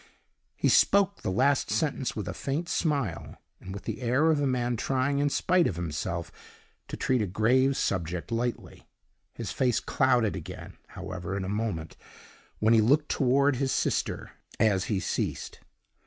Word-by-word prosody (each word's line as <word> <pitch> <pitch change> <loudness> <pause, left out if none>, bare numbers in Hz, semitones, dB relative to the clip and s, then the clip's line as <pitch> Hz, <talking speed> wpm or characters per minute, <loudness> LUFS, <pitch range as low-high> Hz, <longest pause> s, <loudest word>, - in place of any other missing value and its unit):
He - - +1
spoke 200 0 +4
the - - -2
last 130 +8 +2
sentence 145 -5 -1
with 105 -4 -4
a - - -3
faint 150 +5 -3
smile, 140 - -2 0.2
and 95 - -9
with 100 0 -7
the - - -5
air 130 +7 +3
of 150 -2 +1
a 140 - +2
man 125 -2 0
trying, 135 +4 0
in 145 0 +2
spite 180 +4 +2
of 90 - -3
himself, 85 0 -4 0.6
to - - -6
treat 130 -3 +1
a 105 - 0
grave 125 +8 +2
subject 90 +2 -2
lightly. 120 +1 -3 0.5
His - - -5
face 125 -4 +1
clouded 125 -6 +2
again, 90 - -8
however, 95 +1 -6
in 95 - -3
a - - -4
moment, 100 -7 -3 0.6
when 110 +2 +3
he 110 - +6
looked 145 +7 +3
toward 135 +1 +2
his 135 0 0
sister, - - -1 0.3
as 100 -4 +3
he 100 -4 -1
ceased. - - -3
120 Hz, 165 wpm, -28 LUFS, 95-140 Hz, 0.6 s, he